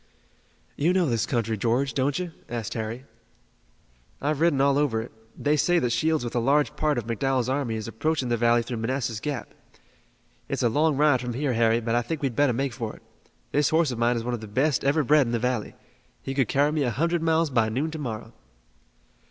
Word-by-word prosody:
"You 165 Hz, +5 st, +2 dB
know 185 Hz, -2 st, +3 dB
this 115 Hz, -6 st, 0 dB
country, 115 Hz, -3 st, 0 dB
George, 120 Hz, +6 st, 0 dB
don't 135 Hz, +1 st, 0 dB
you?" 180 Hz, -2 st, -4 dB, 0.2 s
asked 115 Hz, -3 st, -4 dB
Harry. 115 Hz, +3 st, -5 dB, 1.1 s
"I've 150 Hz, 0 st, -1 dB
ridden 165 Hz, -5 st, +3 dB
over 140 Hz, 0 st, +3 dB
all -, -, +4 dB
of 115 Hz, -, -5 dB
it. -, -, -14 dB, 0.3 s
They 145 Hz, +1 st, +1 dB
say 175 Hz, +4 st, +2 dB
that 125 Hz, -7 st, +1 dB
Shields 155 Hz, +3 st, +1 dB
with 120 Hz, -, -4 dB
a 120 Hz, -, +1 dB
large 140 Hz, +5 st, +2 dB
part 150 Hz, -3 st, 0 dB
of 120 Hz, -, -2 dB
McDowell's 125 Hz, +2 st, 0 dB
army 130 Hz, -4 st, -1 dB
is 110 Hz, 0 st, -5 dB
approaching 130 Hz, +3 st, -1 dB
the 120 Hz, -, +2 dB
valley 120 Hz, 0 st, +3 dB
through 120 Hz, 0 st, -5 dB
Manassas 115 Hz, -1 st, -2 dB
Gap. 140 Hz, +1 st, -5 dB, 1.0 s
It's -, -, -1 dB
a 120 Hz, -, +4 dB
long 150 Hz, +4 st, +2 dB
ride 145 Hz, -4 st, +4 dB
from 120 Hz, -1 st, -4 dB
here, 135 Hz, 0 st, 0 dB
Harry, 115 Hz, 0 st, +3 dB
but 115 Hz, 0 st, -2 dB
I 120 Hz, -, +3 dB
think 145 Hz, +5 st, -5 dB
we'd 130 Hz, -4 st, -1 dB
better 145 Hz, -2 st, +3 dB
make 135 Hz, +1 st, -1 dB
for 115 Hz, -3 st, -5 dB
it. -, -, -18 dB, 0.5 s
This 145 Hz, 0 st, +2 dB
horse 160 Hz, -3 st, +2 dB
of 120 Hz, -, -5 dB
mine 120 Hz, +1 st, +2 dB
is 115 Hz, -, -3 dB
one 125 Hz, +1 st, -2 dB
of 120 Hz, -, -4 dB
the 110 Hz, -, -8 dB
best 135 Hz, +7 st, +1 dB
ever 145 Hz, +3 st, +2 dB
bred 145 Hz, -1 st, +4 dB
in 115 Hz, -, -3 dB
the -, -, +2 dB
valley. 125 Hz, -1 st, -2 dB, 0.5 s
He 135 Hz, -, -4 dB
could 135 Hz, -4 st, +1 dB
carry 145 Hz, +5 st, +2 dB
me 155 Hz, -1 st, -1 dB
a 130 Hz, -, +1 dB
hundred 165 Hz, +7 st, 0 dB
miles 165 Hz, -1 st, +2 dB
by 115 Hz, -3 st, +2 dB
noon 140 Hz, +8 st, -2 dB
to 160 Hz, -, -6 dB
morrow." 115 Hz, -4 st, -5 dB
130 Hz, 225 wpm, -25 LUFS, 115-150 Hz, 1.1 s, all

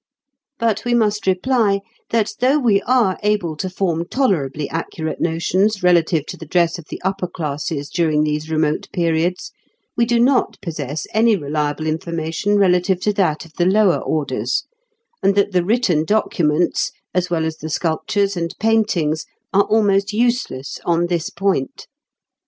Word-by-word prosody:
But 225 Hz, -3 st, 0 dB
we 240 Hz, 0 st, +1 dB
must 210 Hz, -3 st, +1 dB
reply, 200 Hz, +1 st, +2 dB, 0.3 s
that 220 Hz, -2 st, +1 dB
though 260 Hz, +4 st, +3 dB
we 225 Hz, -8 st, +3 dB
are 240 Hz, -7 st, +2 dB
able 205 Hz, -6 st, 0 dB
to 185 Hz, -, -3 dB
form 170 Hz, -3 st, -1 dB
tolerably 155 Hz, -, 0 dB
accurate 160 Hz, -1 st, -4 dB
notions 185 Hz, +5 st, +1 dB
relative 170 Hz, -3 st, +3 dB
to -, -, -7 dB
the 160 Hz, -, -10 dB
dress 170 Hz, +1 st, +1 dB
of 165 Hz, -, -11 dB
the -, -, -6 dB
upper 190 Hz, -1 st, -1 dB
classes 150 Hz, -3 st, -4 dB
during 155 Hz, -3 st, +1 dB
these 150 Hz, +1 st, -2 dB
remote 155 Hz, -1 st, 0 dB
periods, 170 Hz, 0 st, 0 dB, 0.4 s
we 235 Hz, -, +3 dB
do 235 Hz, 0 st, +1 dB
not 255 Hz, +2 st, +2 dB
possess 150 Hz, -3 st, -4 dB
any 220 Hz, 0 st, +4 dB
reliable 150 Hz, -1 st, -2 dB
information 165 Hz, +5 st, -1 dB
relative 180 Hz, -1 st, +3 dB
to 210 Hz, -, +1 dB
that 175 Hz, -6 st, 0 dB
of 160 Hz, -, -18 dB
the 175 Hz, -, +3 dB
lower 200 Hz, -1 st, +4 dB
orders, 130 Hz, -5 st, -1 dB, 0.6 s
and 195 Hz, -, +3 dB
that 200 Hz, 0 st, +2 dB
the 180 Hz, -2 st, +2 dB
written 200 Hz, -6 st, +2 dB
documents, 170 Hz, -4 st, +1 dB, 0.2 s
as 180 Hz, 0 st, 0 dB
well 165 Hz, -2 st, 0 dB
as 160 Hz, 0 st, -3 dB
the 160 Hz, -, -6 dB
sculptures 195 Hz, +6 st, 0 dB
and 170 Hz, -1 st, -3 dB
paintings, 210 Hz, -9 st, +1 dB, 0.3 s
are 200 Hz, +1 st, +4 dB
almost 205 Hz, -2 st, +2 dB
useless 235 Hz, -, -1 dB
on 170 Hz, 0 st, +1 dB
this 170 Hz, -2 st, -1 dB
point. 195 Hz, -9 st, -2 dB
180 Hz, 155 wpm, -19 LUFS, 160-210 Hz, 0.6 s, any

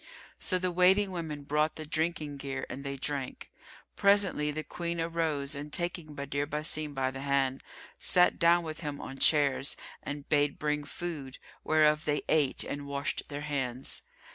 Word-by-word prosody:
So 185 Hz, -, +2 dB
the 185 Hz, 0 st, 0 dB
waiting 190 Hz, +3 st, +5 dB
women 160 Hz, -5 st, -4 dB
brought 150 Hz, +2 st, +1 dB
the 155 Hz, -, -6 dB
drinking 155 Hz, -2 st, -1 dB
gear 135 Hz, -1 st, -4 dB
and 140 Hz, -, -6 dB
they 140 Hz, 0 st, -4 dB
drank. 135 Hz, -1 st, -4 dB, 0.4 s
Presently, 200 Hz, -7 st, +3 dB
the 155 Hz, +1 st, -3 dB
Queen 170 Hz, +1 st, -3 dB
arose 160 Hz, -4 st, -1 dB
and 145 Hz, +1 st, -6 dB
taking 175 Hz, -3 st, -2 dB
Badr 140 Hz, 0 st, -2 dB
Basim 150 Hz, 0 st, -3 dB
by 130 Hz, -1 st, +1 dB
the 135 Hz, 0 st, -7 dB
hand, 135 Hz, -1 st, +1 dB, 0.4 s
sat 180 Hz, -1 st, +4 dB
down 170 Hz, +1 st, +5 dB
with 155 Hz, -1 st, -5 dB
him 145 Hz, -3 st, -4 dB
on 135 Hz, -, -7 dB
chairs 140 Hz, -3 st, +3 dB, 0.2 s
and 145 Hz, 0 st, -6 dB
bade 145 Hz, -1 st, +2 dB
bring 150 Hz, -1 st, -1 dB
food, 145 Hz, -5 st, -5 dB, 0.3 s
whereof 155 Hz, 0 st, +4 dB
they 150 Hz, -1 st, 0 dB
ate, 150 Hz, -4 st, +3 dB
and 145 Hz, 0 st, -5 dB
washed 140 Hz, +3 st, -2 dB
their 145 Hz, 0 st, -4 dB
hands. 135 Hz, -4 st, -3 dB
150 Hz, 165 wpm, -30 LUFS, 140-165 Hz, 0.4 s, waiting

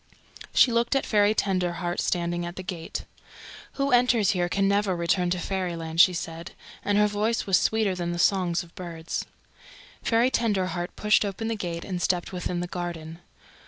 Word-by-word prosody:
She 250 Hz, -, +5 dB
looked 235 Hz, +3 st, +1 dB
at 270 Hz, -, +1 dB
Fairy 210 Hz, 0 st, +3 dB
Tenderheart 180 Hz, -3 st, -1 dB
standing 175 Hz, -1 st, -1 dB
at 175 Hz, +1 st, -6 dB
the 185 Hz, -, -6 dB
gate. 170 Hz, -3 st, -5 dB, 0.7 s
"Who 275 Hz, 0 st, -1 dB
enters 245 Hz, -4 st, +4 dB
here 175 Hz, -2 st, 0 dB
can 195 Hz, +1 st, +1 dB
never 200 Hz, -1 st, +2 dB
return 175 Hz, +1 st, +1 dB
to 180 Hz, -, 0 dB
Fairyland," 170 Hz, -3 st, 0 dB
she 185 Hz, -, +6 dB
said, 165 Hz, -1 st, -6 dB, 0.3 s
and 205 Hz, 0 st, +1 dB
her 210 Hz, -, +5 dB
voice 210 Hz, +2 st, 0 dB
was 190 Hz, -2 st, +4 dB
sweeter 220 Hz, -3 st, +1 dB
than 175 Hz, -1 st, -3 dB
the 175 Hz, -, -3 dB
songs 180 Hz, -1 st, +2 dB
of 170 Hz, -, -17 dB
birds. 170 Hz, -2 st, -5 dB, 0.7 s
Fairy 235 Hz, +2 st, +2 dB
Tenderheart 185 Hz, -7 st, -1 dB
pushed 210 Hz, 0 st, +3 dB
open 210 Hz, +3 st, -3 dB
the 225 Hz, -, -1 dB
gate 170 Hz, -4 st, -4 dB
and 180 Hz, -2 st, -4 dB
stepped 180 Hz, +1 st, 0 dB
within 180 Hz, -1 st, -3 dB
the -, -, -2 dB
Garden. 170 Hz, -2 st, -6 dB
185 Hz, 175 wpm, -26 LUFS, 175-210 Hz, 0.7 s, she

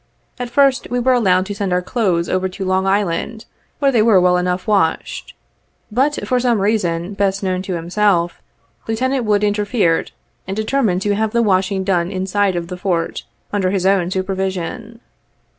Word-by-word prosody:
At 245 Hz, -1 st, -4 dB
first, 275 Hz, +1 st, +2 dB
we 245 Hz, -, -1 dB
were 255 Hz, +1 st, +3 dB
allowed 185 Hz, -6 st, +3 dB
to 205 Hz, -, -5 dB
send 200 Hz, -2 st, -3 dB
our 180 Hz, 0 st, +1 dB
clothes 180 Hz, -6 st, 0 dB
over 185 Hz, 0 st, 0 dB
to 190 Hz, +1 st, -6 dB
Long 190 Hz, +1 st, +1 dB
Island, 205 Hz, +3 st, -1 dB, 0.3 s
where 275 Hz, -1 st, +2 dB
they 235 Hz, -4 st, +3 dB
were 215 Hz, -3 st, +5 dB
well 180 Hz, 0 st, +3 dB
enough 180 Hz, 0 st, -1 dB
washed, 195 Hz, -6 st, 0 dB, 0.6 s
but 270 Hz, +6 st, 0 dB
for 250 Hz, -, +2 dB
some 240 Hz, -3 st, +1 dB
reason 195 Hz, -3 st, 0 dB
best 200 Hz, 0 st, 0 dB
known 185 Hz, -1 st, -1 dB
to 185 Hz, -1 st, -4 dB
himself, 175 Hz, 0 st, 0 dB, 0.5 s
Lieutenant 255 Hz, +3 st, 0 dB
Wood 210 Hz, -1 st, +2 dB
interfered, 205 Hz, -4 st, +1 dB, 0.4 s
and 195 Hz, +2 st, -4 dB
deter 220 Hz, +6 st, 0 dB
mined 190 Hz, -5 st, +1 dB
to 205 Hz, -, +1 dB
have 215 Hz, +1 st, -1 dB
the 235 Hz, 0 st, +3 dB
washing 190 Hz, -1 st, +1 dB
done 180 Hz, -3 st, 0 dB
inside 190 Hz, +1 st, 0 dB
of 170 Hz, -1 st, -3 dB
the 180 Hz, 0 st, -6 dB
Fort, 175 Hz, -3 st, -2 dB, 0.3 s
under 195 Hz, -3 st, +1 dB
his 190 Hz, -1 st, -1 dB
own 190 Hz, -2 st, +2 dB
supervision. 190 Hz, +4 st, -3 dB
195 Hz, 175 wpm, -18 LUFS, 185-220 Hz, 0.6 s, were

